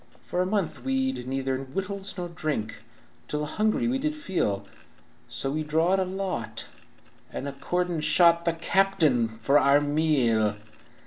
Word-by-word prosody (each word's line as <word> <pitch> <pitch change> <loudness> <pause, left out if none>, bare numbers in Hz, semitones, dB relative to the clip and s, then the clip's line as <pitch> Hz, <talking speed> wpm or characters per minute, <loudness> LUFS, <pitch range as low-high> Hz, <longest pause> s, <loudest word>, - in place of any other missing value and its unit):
"For 180 - -1
a 185 - 0
month 195 -4 -1
we'd 265 - -1
neither 135 0 -1
wittles 195 +9 -5
nor 175 -1 -3
drink, 145 -10 -3 0.5
Till 150 0 -2
a - - -1
hungry 215 +9 0
we 260 +2 0
did 305 +2 -1
feel, 170 - -1 0.6
So 135 - -2
we 155 +2 -1
drawed 160 +5 +2
a 190 - +1
lot, 185 -10 -4 0.7
and 140 - -4
accordin' 175 +4 -2
shot 170 +2 +5
The 170 - +2
captain 165 - +2
for 115 +6 +2
our 140 +1 +5
meal. 140 -8 +2
160 Hz, 145 wpm, -27 LUFS, 135-190 Hz, 0.7 s, shot